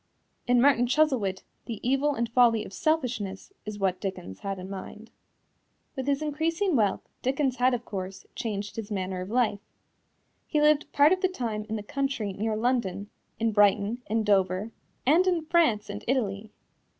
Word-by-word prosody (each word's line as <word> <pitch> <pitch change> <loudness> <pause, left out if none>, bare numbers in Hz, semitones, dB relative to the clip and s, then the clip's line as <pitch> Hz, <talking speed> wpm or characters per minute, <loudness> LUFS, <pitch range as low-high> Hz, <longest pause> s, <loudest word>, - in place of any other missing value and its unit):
In 245 0 +4
Martin 245 -2 +4
Chuzzlewit 245 -10 +1 0.2
the 225 -4 -5
evil 275 +2 +2
and 235 -2 -1
folly 230 -2 +4
of - - -11
selfishness 245 - -1
is 210 -1 -5
what 190 -2 0
Dickens 180 - -5
had 195 -1 -4
in 185 0 -7
mind. 200 +3 -8 0.8
With 265 -1 -4
his 280 +1 +1
increasing 325 +4 0
wealth, 210 -5 +1
Dickens 265 0 0
had, 250 0 +3
of 235 -1 -6
course, 190 -1 -6
changed 205 -3 -4
his 220 -2 -5
manner 190 -2 -3
of 185 - -6
life. 225 -3 +1 0.9
He 300 - +1
lived 300 0 +3
part 290 +2 +5
of 370 - -2
the 375 - +4
time 225 -10 -4
in 220 - -2
the 210 - -4
country 265 -4 -2
near 215 +3 -1
London, 215 -4 -1 0.3
in 225 0 +1
Brighton, 205 +3 +3
in 220 +1 0
Dover, 195 +1 +1 0.3
and 330 +8 +4
in 345 -3 +1
France 310 -11 +2
and 205 0 -6
Italy. 215 -5 -1
225 Hz, 170 wpm, -27 LUFS, 200-275 Hz, 0.9 s, part